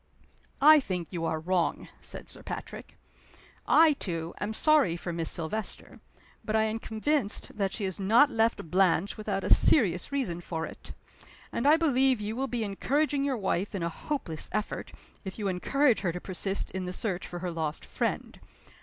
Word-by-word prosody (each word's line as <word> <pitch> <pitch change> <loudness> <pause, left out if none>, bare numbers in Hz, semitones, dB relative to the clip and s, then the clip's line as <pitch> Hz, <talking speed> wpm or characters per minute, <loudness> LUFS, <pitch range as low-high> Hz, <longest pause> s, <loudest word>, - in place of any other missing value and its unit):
"I 310 +1 +9
think 180 - -4
you 165 -2 -2
are 160 -1 -1
wrong," 175 +1 -1
said - - -6
Sir - - -12
Patrick. - - -8 0.7
"I, 320 -1 +6
too, 170 - -4
am 205 +2 -2
sorry 275 - +3
for 175 0 -5
Miss 165 -1 0
Silvester. 175 +7 -3 0.4
But 215 - -2
I 220 - +4
am 220 +1 -1
convinced 225 +1 -1
that 195 -2 -1
she 210 - -4
has 190 -1 -3
not 230 +9 +5
left 225 -8 0
Blanche 185 +1 +2
without 205 -3 -3
a - - +6
serious 185 - +4
reason 205 -12 -2
for 165 -2 -4
it. - - -10 0.6
And 235 - -1
I 305 +2 +7
believe 265 -6 +3
you 210 +1 -4
will 265 +2 -1
be 240 -3 -2
encouraging 280 +8 0
your 275 -3 0
wife 195 0 -1
in 185 - -2
a 170 - 0
hopeless 170 - -5
effort, 215 0 -3 0.3
if 190 -2 -7
you 210 -2 -2
encourage 245 +8 +2
her 180 -4 -1
to 180 - -5
persist 195 +2 -3
in 190 -1 -4
the 180 - -4
search 185 -3 -3
for 175 - -7
her 180 0 -4
lost 160 -2 -3
friend. - - -3
200 Hz, 180 wpm, -28 LUFS, 175-255 Hz, 0.7 s, I